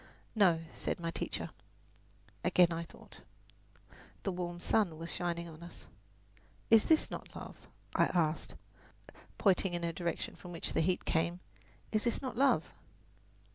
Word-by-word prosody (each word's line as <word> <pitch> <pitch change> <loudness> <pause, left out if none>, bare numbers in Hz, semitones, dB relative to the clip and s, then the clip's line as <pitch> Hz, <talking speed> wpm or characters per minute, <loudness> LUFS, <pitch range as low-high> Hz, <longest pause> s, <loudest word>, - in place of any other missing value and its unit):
"No," 185 -7 +5
said - - -2
my 165 -1 -2
teacher. - - -3 0.9
Again 175 -2 +5
I 165 - -2
thought. - - -15 1.0
The 195 - 0
warm 175 -1 -4
sun 180 -4 +2
was 165 +1 -5
shining 170 -1 -2
on 160 -1 -11
us. 170 - -11 0.9
"Is 225 -1 +8
this 320 -1 +3
not - - -7
love?" - - -9 0.3
I - - +5
asked, 160 -3 0 0.8
pointing 190 -2 +3
in 175 - -3
the 170 0 0
direction 170 0 -3
from 175 -1 -10
which 165 - -1
the - - +3
heat 180 +2 +1
came. 170 +2 +1 0.5
"Is 215 +1 +1
this 235 - +1
not 260 -4 -4
love?" 270 +3 +4
175 Hz, 145 wpm, -34 LUFS, 170-195 Hz, 1.0 s, Is